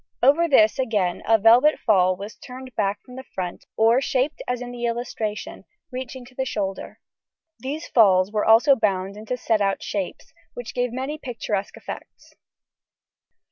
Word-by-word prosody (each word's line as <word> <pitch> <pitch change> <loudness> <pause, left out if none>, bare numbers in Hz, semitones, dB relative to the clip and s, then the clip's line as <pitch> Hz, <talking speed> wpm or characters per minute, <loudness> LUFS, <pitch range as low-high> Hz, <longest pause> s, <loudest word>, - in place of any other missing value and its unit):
Over 295 +6 +5
this 220 -6 +4
again 210 -8 0
a 225 0 +5
velvet 235 +8 +5
fall 185 -4 +3
was 200 +4 -8
turned 255 0 -11
back 200 +1 -1
from 250 0 -13
the 260 - -7
front 180 -7 -6
or 230 +4 +4
shaped 275 +2 -1
as 250 -1 -1
in 245 0 -6
the 240 -1 -4
illustration, 230 -3 -4 0.3
reaching 255 0 -6
to 250 - -17
the 265 - -2
shoulder. 200 -6 -4 0.6
These 295 +5 -5
falls 195 -4 +4
were 210 -1 0
also 235 +6 +6
bound 195 -4 -1
into 220 +4 -5
set 220 -3 0
out 195 -1 0
shapes, 195 -3 -5 0.2
which 245 -2 -7
gave 245 -1 -1
many 265 +5 -4
picturesque 220 -6 -4
effects. - - -10
230 Hz, 160 wpm, -23 LUFS, 205-255 Hz, 0.6 s, also